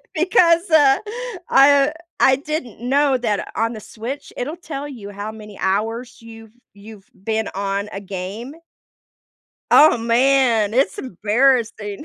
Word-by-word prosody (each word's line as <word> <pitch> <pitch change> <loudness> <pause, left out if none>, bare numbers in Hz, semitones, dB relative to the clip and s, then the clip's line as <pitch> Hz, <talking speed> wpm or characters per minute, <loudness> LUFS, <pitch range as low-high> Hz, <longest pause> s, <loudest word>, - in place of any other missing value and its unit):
Because, 340 +1 +3
uh, 290 -4 +5 0.5
I 280 +1 +5 0.3
I 265 - +5
didn't 275 -6 -6
know 275 +2 +2
that 215 -4 -3
on 230 +1 0
the 220 - -7
Switch, 235 +7 -8
it'll 295 +7 -5
tell 290 -5 -7
you 225 -8 -9
how 205 +2 -6
many 210 -2 -12
hours 225 +5 -2
you've 225 -1 -13 0.2
you've 205 0 -14
been 220 +3 -3
on 200 +1 -2
a 200 - -6
game. 200 +7 -7 1.2
Oh, 310 -4 +7
man, 235 -2 +2
it's 270 +2 +1
embarrassing. 220 - 0
230 Hz, 130 wpm, -20 LUFS, 210-275 Hz, 1.2 s, Oh